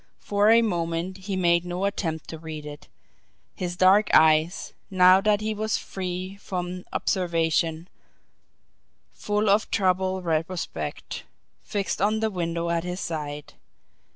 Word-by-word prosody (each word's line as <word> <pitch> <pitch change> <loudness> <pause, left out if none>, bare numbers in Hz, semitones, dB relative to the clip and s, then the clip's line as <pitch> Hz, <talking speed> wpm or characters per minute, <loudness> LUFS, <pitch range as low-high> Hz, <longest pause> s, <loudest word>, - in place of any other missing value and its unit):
For 205 +1 +2
a 230 +1 +6
moment 170 -2 -2
he 195 +1 -5
made 170 -2 +3
no 180 +2 -3
attempt 165 -6 -3
to 160 - -7
read 155 -2 -7
it, 145 0 -9 0.7
his 175 -1 -4
dark 195 +3 +5
eyes, 155 +2 +3 0.2
now 185 0 +6
that 210 0 +2
he 215 0 -1
was 215 +1 -1
free 185 +1 -5
from 180 -2 -5
observation, 165 -2 0 1.3
full 210 +1 -1
of 205 +2 +3
troubled 185 -1 0
retrospect, 160 - -3 0.4
fixed 200 -3 -3
on 215 +2 +2
the 220 0 0
window 170 -2 -2
at 170 -1 0
his 180 +1 -4
side. 150 -4 -5
180 Hz, 130 wpm, -25 LUFS, 165-195 Hz, 1.3 s, a